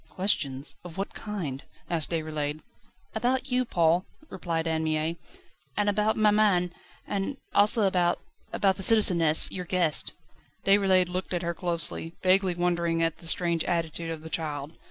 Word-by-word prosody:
"Questions? 145 Hz, -8 st, -1 dB
Of 175 Hz, -1 st, -10 dB
what 195 Hz, -, -4 dB
kind?" 170 Hz, -11 st, -5 dB, 0.3 s
asked 165 Hz, -3 st, +2 dB
Déroulède. 155 Hz, -2 st, -3 dB, 0.5 s
"About 255 Hz, +4 st, -1 dB
you, 250 Hz, 0 st, +1 dB
Paul," 170 Hz, -3 st, +1 dB, 0.2 s
replied 165 Hz, -2 st, -3 dB
Anne 160 Hz, 0 st, 0 dB
Mie, 155 Hz, +1 st, -1 dB, 0.6 s
"and 205 Hz, 0 st, +1 dB
about 210 Hz, +2 st, +1 dB
maman, 205 Hz, -5 st, +3 dB, 0.3 s
and 200 Hz, +7 st, -3 dB, 0.2 s
also 210 Hz, +2 st, +3 dB
about 180 Hz, -3 st, +2 dB, 0.3 s
about 195 Hz, -2 st, +1 dB
the -, -, -5 dB
citizeness, 180 Hz, -7 st, +5 dB
your 180 Hz, -1 st, -5 dB
guest." 175 Hz, -4 st, 0 dB, 0.5 s
Déroulède 195 Hz, -2 st, +4 dB
looked 185 Hz, 0 st, -3 dB
at 175 Hz, -, -2 dB
her 170 Hz, 0 st, -1 dB
closely, 170 Hz, -1 st, 0 dB
vaguely 185 Hz, -1 st, +3 dB
wondering 170 Hz, -1 st, 0 dB
at 165 Hz, -1 st, -1 dB
the 165 Hz, -, -8 dB
strange 170 Hz, 0 st, +1 dB
attitude 165 Hz, -1 st, -2 dB
of 160 Hz, -1 st, -6 dB
the 160 Hz, -, -8 dB
child. 150 Hz, -2 st, -3 dB
175 Hz, 150 wpm, -27 LUFS, 160-195 Hz, 0.6 s, citizeness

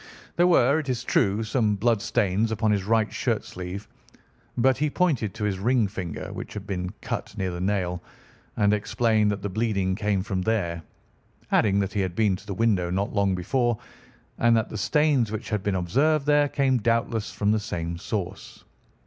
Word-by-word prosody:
There 175 Hz, +1 st, +4 dB
were, 150 Hz, -4 st, +4 dB
it 145 Hz, -4 st, -5 dB
is 125 Hz, -3 st, -1 dB
true, 100 Hz, +3 st, +1 dB
some 110 Hz, -2 st, +1 dB
blood 115 Hz, +1 st, +1 dB
stains 110 Hz, -1 st, +1 dB
upon 110 Hz, 0 st, +1 dB
his 100 Hz, -2 st, 0 dB
right 110 Hz, 0 st, +1 dB
shirt -, -, -1 dB
sleeve, 90 Hz, +3 st, -7 dB, 0.7 s
but 130 Hz, +2 st, +3 dB
he 150 Hz, 0 st, +1 dB
pointed 140 Hz, -, 0 dB
to 110 Hz, -, -5 dB
his 100 Hz, -3 st, -1 dB
ring 115 Hz, +1 st, +2 dB
finger, 95 Hz, -5 st, -6 dB
which -, -, -7 dB
had 100 Hz, -2 st, -6 dB
been 90 Hz, -3 st, -3 dB
cut 105 Hz, -, -5 dB
near 95 Hz, -2 st, -1 dB
the 85 Hz, 0 st, -5 dB
nail, 90 Hz, -3 st, -1 dB, 0.6 s
and 105 Hz, 0 st, +3 dB
explained 110 Hz, 0 st, +1 dB
that 100 Hz, -1 st, -3 dB
the 100 Hz, -, -2 dB
bleeding 100 Hz, -2 st, 0 dB
came 105 Hz, -2 st, 0 dB
from 95 Hz, -2 st, -2 dB
there, 90 Hz, -6 st, -1 dB, 0.7 s
adding 100 Hz, -2 st, +3 dB
that 100 Hz, 0 st, -3 dB
he 105 Hz, -, 0 dB
had 90 Hz, -2 st, -2 dB
been 105 Hz, -3 st, +2 dB
to 100 Hz, -, -17 dB
the 100 Hz, -, -4 dB
window 100 Hz, -5 st, +1 dB
not 95 Hz, +4 st, -1 dB
long 100 Hz, -2 st, +2 dB
before, 120 Hz, +6 st, 0 dB, 0.6 s
and 115 Hz, -1 st, +4 dB
that 110 Hz, -, -1 dB
the -, -, -7 dB
stains 145 Hz, -3 st, +2 dB
which 110 Hz, +1 st, -5 dB
had 105 Hz, -2 st, 0 dB
been 100 Hz, 0 st, -1 dB
observed 140 Hz, -, +1 dB
there 145 Hz, 0 st, +4 dB
came 135 Hz, -3 st, +2 dB
doubtless 115 Hz, -1 st, 0 dB
from 105 Hz, 0 st, 0 dB
the 110 Hz, -, +2 dB
same 85 Hz, -4 st, -4 dB
source. 100 Hz, -1 st, -5 dB
105 Hz, 190 wpm, -25 LUFS, 95-115 Hz, 0.7 s, There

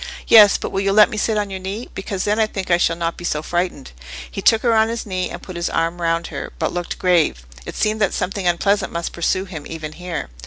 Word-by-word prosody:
"Yes, 210 Hz, -3 st, +8 dB
but -, -, -5 dB
will 195 Hz, -, -1 dB
you 195 Hz, 0 st, +1 dB
let 210 Hz, 0 st, +6 dB
me 215 Hz, -, -4 dB
sit 215 Hz, 0 st, 0 dB
on 205 Hz, -1 st, -2 dB
your 190 Hz, -, -4 dB
knee? 195 Hz, +6 st, -5 dB
because 195 Hz, -1 st, -4 dB
then 210 Hz, +2 st, +1 dB
I 220 Hz, -, +3 dB
think 190 Hz, -3 st, -5 dB
I 175 Hz, -, +5 dB
shall 165 Hz, -1 st, +1 dB
not 170 Hz, 0 st, -3 dB
be -, -, -9 dB
so 150 Hz, -3 st, -1 dB
frightened." 175 Hz, -4 st, -2 dB, 0.4 s
He -, -, -5 dB
took 225 Hz, -1 st, +4 dB
her 235 Hz, -2 st, +3 dB
on 220 Hz, 0 st, +3 dB
his 230 Hz, 0 st, -4 dB
knee, 185 Hz, -3 st, -2 dB
and -, -, -8 dB
put 185 Hz, -, -9 dB
his 170 Hz, 0 st, -2 dB
arm 165 Hz, +2 st, -1 dB
round 165 Hz, 0 st, 0 dB
her, -, -, -5 dB
but -, -, -2 dB
looked 175 Hz, -1 st, -4 dB
grave: 165 Hz, -, +2 dB, 0.2 s
it -, -, -6 dB
seemed 215 Hz, 0 st, 0 dB
that 195 Hz, -, +3 dB
something 190 Hz, 0 st, -2 dB
unpleasant 195 Hz, +3 st, +1 dB
must 170 Hz, 0 st, -4 dB
pursue 185 Hz, +2 st, 0 dB
him 160 Hz, -6 st, -8 dB
even 155 Hz, -2 st, -6 dB
here. 175 Hz, -, -6 dB
185 Hz, 260 wpm, -20 LUFS, 170-205 Hz, 0.4 s, Yes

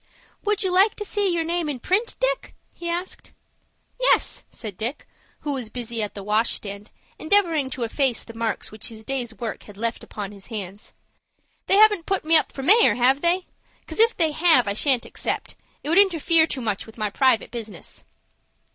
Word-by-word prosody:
"Would 420 Hz, 0 st, 0 dB
you 375 Hz, -, 0 dB
like 390 Hz, +3 st, +4 dB
to 420 Hz, -, -5 dB
see 405 Hz, -1 st, 0 dB
your 335 Hz, -1 st, 0 dB
name 335 Hz, -1 st, -1 dB
in 275 Hz, -4 st, -4 dB
print, 400 Hz, -, 0 dB
Dick?" -, -, -1 dB, 0.2 s
he 340 Hz, -, -6 dB
asked. 350 Hz, +2 st, -5 dB, 0.7 s
"Yes," -, -, +2 dB
said 215 Hz, -5 st, -8 dB
Dick, 235 Hz, +9 st, -4 dB, 0.4 s
who 290 Hz, -, -2 dB
was 250 Hz, -5 st, -3 dB
busy 235 Hz, -1 st, -4 dB
at 210 Hz, -, -3 dB
the 200 Hz, -, -7 dB
wash 215 Hz, +3 st, +1 dB
stand, 200 Hz, 0 st, -5 dB, 0.3 s
endeavoring 325 Hz, -6 st, +2 dB
to 260 Hz, -2 st, -4 dB
efface 245 Hz, +1 st, +1 dB
the 230 Hz, -, -11 dB
marks 225 Hz, -1 st, -3 dB
which 215 Hz, 0 st, -6 dB
his 220 Hz, -1 st, -10 dB
day's 255 Hz, -3 st, -3 dB
work 230 Hz, -2 st, -5 dB
had 205 Hz, -2 st, -13 dB
left 230 Hz, +2 st, -2 dB
upon 205 Hz, -2 st, -7 dB
his 200 Hz, -2 st, -13 dB
hands. 205 Hz, -3 st, -7 dB, 0.7 s
"They -, -, +4 dB
haven't 415 Hz, -4 st, +5 dB
put 390 Hz, -5 st, 0 dB
me 325 Hz, +1 st, +5 dB
up 315 Hz, -, +4 dB
for 270 Hz, -, -7 dB
mayor, 435 Hz, -, +6 dB
have 260 Hz, +3 st, +3 dB
they? 355 Hz, +2 st, +2 dB, 0.4 s
'Cause -, -, -5 dB
if 460 Hz, +1 st, +4 dB
they 320 Hz, -3 st, +3 dB
have, 315 Hz, -7 st, +4 dB
I 200 Hz, -, 0 dB
shan't 255 Hz, +2 st, +2 dB
accept. -, -, -3 dB, 0.3 s
It 295 Hz, -, -4 dB
would 340 Hz, +4 st, +5 dB
interfere 335 Hz, -4 st, +4 dB
too 265 Hz, -, -4 dB
much 210 Hz, -3 st, -3 dB
with 220 Hz, -, -14 dB
my 215 Hz, -2 st, -2 dB
private 260 Hz, -1 st, +2 dB
business." 225 Hz, -3 st, -8 dB
270 Hz, 195 wpm, -23 LUFS, 225-350 Hz, 0.7 s, mayor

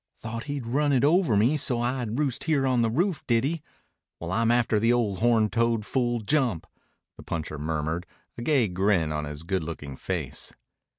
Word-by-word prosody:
"Thought 115 Hz, +1 st, -6 dB
he'd 140 Hz, -4 st, -4 dB
run 145 Hz, +5 st, +1 dB
it 130 Hz, -, +3 dB
over 150 Hz, -, +4 dB
me, 120 Hz, +9 st, +3 dB
so 125 Hz, -4 st, +1 dB
I'd 120 Hz, -2 st, -2 dB
roost 140 Hz, -5 st, -1 dB
here 150 Hz, -4 st, +2 dB
on 130 Hz, -2 st, +2 dB
the 115 Hz, -, +2 dB
roof, 170 Hz, -, 0 dB
did 115 Hz, -1 st, +3 dB
he? 155 Hz, +3 st, -1 dB, 0.6 s
Well, 85 Hz, +1 st, -5 dB
I'm 115 Hz, +3 st, +2 dB
after 120 Hz, -2 st, +3 dB
the 115 Hz, +2 st, +3 dB
ol' 115 Hz, -6 st, +1 dB
horn 115 Hz, -1 st, +3 dB
toad 115 Hz, -1 st, 0 dB
full 120 Hz, -2 st, 0 dB
jump," 120 Hz, -, 0 dB, 0.5 s
the -, -, -11 dB
puncher 80 Hz, -2 st, -4 dB
murmured, 80 Hz, +3 st, -2 dB, 0.3 s
a -, -, -7 dB
gay 130 Hz, -3 st, +2 dB
grin 90 Hz, -3 st, +1 dB
on 75 Hz, 0 st, -2 dB
his 75 Hz, +1 st, -6 dB
good 95 Hz, +1 st, -1 dB
looking 75 Hz, -4 st, -6 dB
face. -, -, -4 dB
115 Hz, 190 wpm, -26 LUFS, 95-130 Hz, 0.6 s, over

